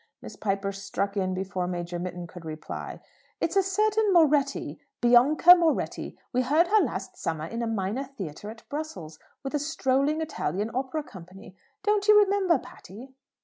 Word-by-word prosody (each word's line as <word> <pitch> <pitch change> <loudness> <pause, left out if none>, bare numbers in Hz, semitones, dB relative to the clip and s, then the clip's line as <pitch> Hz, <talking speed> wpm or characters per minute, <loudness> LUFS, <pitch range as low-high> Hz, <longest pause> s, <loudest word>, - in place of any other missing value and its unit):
Miss - - -10
Piper 195 -1 -2
struck 200 +1 -3
in 185 -2 -1
before 185 -1 -3
Major 175 -1 -4
Mitton 175 0 -5
could 170 +1 -11
reply. 155 -1 -7 0.4
"It's 335 - -1
a 390 - +6
certain 420 +2 +1
Moretti: 295 -5 +2 0.2
Bianca 255 +8 +7
Moretti. 335 -3 0 0.2
We 250 - +2
heard 305 +7 +2
her 430 +1 +5
last 200 - -4
summer 160 -1 -3
in 230 +8 -5
a 235 - -1
minor 220 +4 -2
theatre 205 - -8
at 225 +1 -12
Brussels, 195 - -6 0.2
with 270 - -5
a 295 - +1
strolling 285 0 0
Italian 215 - -3
Opera 265 +4 -2
Company. 185 -3 -13 0.3
Don't 415 -1 +1
you 425 0 +8
remember, 390 -4 +3
Patty?" 250 0 -12
245 Hz, 160 wpm, -27 LUFS, 190-315 Hz, 0.4 s, you